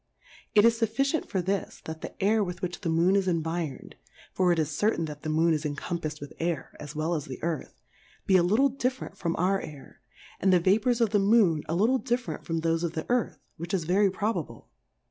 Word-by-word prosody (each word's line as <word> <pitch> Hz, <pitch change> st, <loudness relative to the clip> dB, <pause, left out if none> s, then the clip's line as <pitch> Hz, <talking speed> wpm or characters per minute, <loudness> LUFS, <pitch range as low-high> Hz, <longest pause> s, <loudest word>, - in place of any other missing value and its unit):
It 210 Hz, +1 st, +7 dB
is 230 Hz, 0 st, +4 dB
fuffi 230 Hz, +4 st, +1 dB, 0.2 s
cient -, -, -15 dB
for 185 Hz, -2 st, -1 dB
this, 195 Hz, +2 st, -2 dB
that 160 Hz, 0 st, -7 dB
the -, -, -8 dB
Air 210 Hz, +2 st, +3 dB
with 180 Hz, 0 st, -6 dB
which 175 Hz, +1 st, -4 dB
the 175 Hz, -, -2 dB
Moon 170 Hz, +4 st, +3 dB
is 195 Hz, -1 st, +2 dB
environed, 165 Hz, -3 st, -3 dB, 0.4 s
(for 185 Hz, -1 st, +3 dB
it 170 Hz, -, +2 dB
is 155 Hz, -1 st, 0 dB
certain 170 Hz, +1 st, +1 dB
that 150 Hz, -1 st, -8 dB
the 155 Hz, -, -4 dB
Moon 160 Hz, +2 st, +3 dB
is 155 Hz, -1 st, -1 dB
encompafs'd 155 Hz, +1 st, -4 dB
with 145 Hz, -, -9 dB
Air 165 Hz, -5 st, -3 dB
as 150 Hz, +1 st, -8 dB
well 155 Hz, +3 st, -1 dB
as 150 Hz, -4 st, -2 dB
the 130 Hz, -, -7 dB
Earth) 165 Hz, -3 st, -4 dB, 0.4 s
be 190 Hz, -, +3 dB
a 185 Hz, -, +6 dB
little 215 Hz, +11 st, +3 dB
diffe 260 Hz, 0 st, -1 dB
rent -, -, -7 dB
from 170 Hz, -3 st, -2 dB
our 190 Hz, +2 st, +1 dB
Air, 145 Hz, -3 st, -11 dB, 0.4 s
and 190 Hz, -, +3 dB
the 180 Hz, -, +5 dB
Vapours 225 Hz, +7 st, +2 dB
of 225 Hz, -3 st, +3 dB
the 210 Hz, -, +3 dB
Moon 195 Hz, -6 st, +4 dB
a 165 Hz, -, 0 dB
little 230 Hz, +8 st, +3 dB
different 245 Hz, 0 st, -3 dB
from 165 Hz, -1 st, -1 dB
thofe 165 Hz, 0 st, +1 dB
of 170 Hz, -, -2 dB
the 160 Hz, -, -4 dB
Earth, 245 Hz, -1 st, 0 dB, 0.2 s
which 170 Hz, +3 st, -3 dB
is 180 Hz, -, -1 dB
very 195 Hz, +5 st, +3 dB
probable. 205 Hz, +4 st, -3 dB
175 Hz, 225 wpm, -27 LUFS, 160-205 Hz, 0.4 s, It